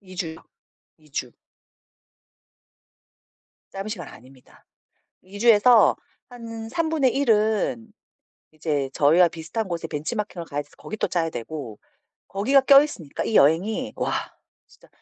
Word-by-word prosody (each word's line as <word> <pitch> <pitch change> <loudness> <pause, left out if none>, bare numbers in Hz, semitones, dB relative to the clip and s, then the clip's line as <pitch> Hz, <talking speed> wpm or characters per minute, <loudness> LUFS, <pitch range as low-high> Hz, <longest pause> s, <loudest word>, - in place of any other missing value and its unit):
2 185 -2 -14
주요, 165 -4 -4 0.6
2 155 -2 -24
주. 125 -4 -4 2.4
짧은 195 +2 -6
시간 175 -8 -6
아닙니다. 130 +2 -17 0.6
2 200 +2 -11
주에서 235 +1 +6 0.3
한 230 -2 -8
1/3 285 -3 0
은 220 +2 +1 0.6
이제 150 -3 -2
저희와 165 +5 +4
비슷한 170 +7 -5
곳에 170 -2 -4
벤치마킹을 175 +3 -4
가야 145 -1 -3
돼서 145 - -25
거기 215 - -8
또 - - 0
짜야 165 -2 -1
되고 120 -3 -7 0.5
거기가 245 +8 +3
껴 275 +1 +8
있으니까 185 - -5
이 220 - -3
여행이 165 +10 +2
와 - - -2 0.5
진짜 - - -22
190 Hz, 230 characters per minute, -24 LUFS, 155-225 Hz, 2.4 s, 껴